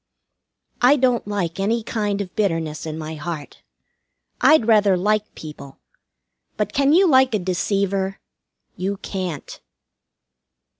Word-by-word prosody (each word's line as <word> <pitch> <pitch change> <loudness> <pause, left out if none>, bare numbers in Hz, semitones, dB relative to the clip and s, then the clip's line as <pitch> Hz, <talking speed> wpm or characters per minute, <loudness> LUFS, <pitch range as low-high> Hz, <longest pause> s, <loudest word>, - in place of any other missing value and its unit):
I 250 +4 +6
don't 250 -5 +1
like 195 -4 -3
any 225 +4 0
kind 205 -3 -2
of 185 -3 -8
bitterness 165 -7 -1
in 155 0 -5
my 160 0 -6
heart. 155 -1 -7 0.8
I'd 310 -7 +5
rather 210 -4 +4
like 210 +3 0
people. 150 -3 -10 0.8
But 210 -1 -2
can 275 +1 +3
you 370 +4 +5
like 260 -5 +4
a - - +3
deceiver? 195 +1 -1 0.6
You 195 +2 -3
can't. 185 -7 -6
200 Hz, 120 wpm, -21 LUFS, 175-220 Hz, 0.8 s, I